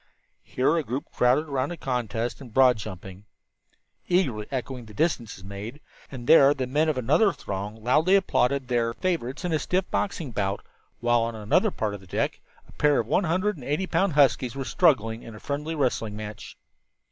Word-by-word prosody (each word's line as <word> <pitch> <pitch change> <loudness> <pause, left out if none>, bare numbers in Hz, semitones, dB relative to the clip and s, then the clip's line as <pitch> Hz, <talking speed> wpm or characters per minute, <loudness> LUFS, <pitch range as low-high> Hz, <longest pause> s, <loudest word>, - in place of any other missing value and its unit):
Here 135 +6 +1
a 160 - 0
group 130 +2 -5
crowded 125 +5 +2
around 140 -1 -1
a 175 - -6
contest 120 -3 -3
in 130 - -10
broad 125 +1 +5
jumping, 95 -1 -9 0.8
eagerly 130 - +1
echoing 130 -2 -4
the 105 - -13
distances 120 - -1
made, 100 +7 -7 0.3
and 125 -3 -8
there 145 -1 +7
the 130 -2 -2
men 150 +5 +1
of 150 - -1
another 155 - +3
throng 100 - -5
loudly 155 - +4
applauded 140 -8 +1
their 120 -2 0
favorites 165 -6 -2
in 175 - -1
a 155 - +2
stiff 185 +4 0
boxing 165 -9 -2
bout, 100 -2 -2 0.4
while 120 0 +3
on 115 0 -2
another 105 -1 +2
part 105 -2 -3
of 100 - -8
the 95 - -16
deck - - -2 0.3
a - - -17
pair 150 -1 +2
of 115 - -1
one 160 - +1
hundred 185 +4 0
and 135 - -11
eighty 150 +8 -1
pound 190 -1 +1
huskies 135 -3 +3
were 135 -1 -4
struggling 115 - +2
in 115 - -10
a - - -10
friendly 150 +5 -3
wrestling 120 -7 -1
match. 105 -1 -8
130 Hz, 190 wpm, -26 LUFS, 115-155 Hz, 0.8 s, there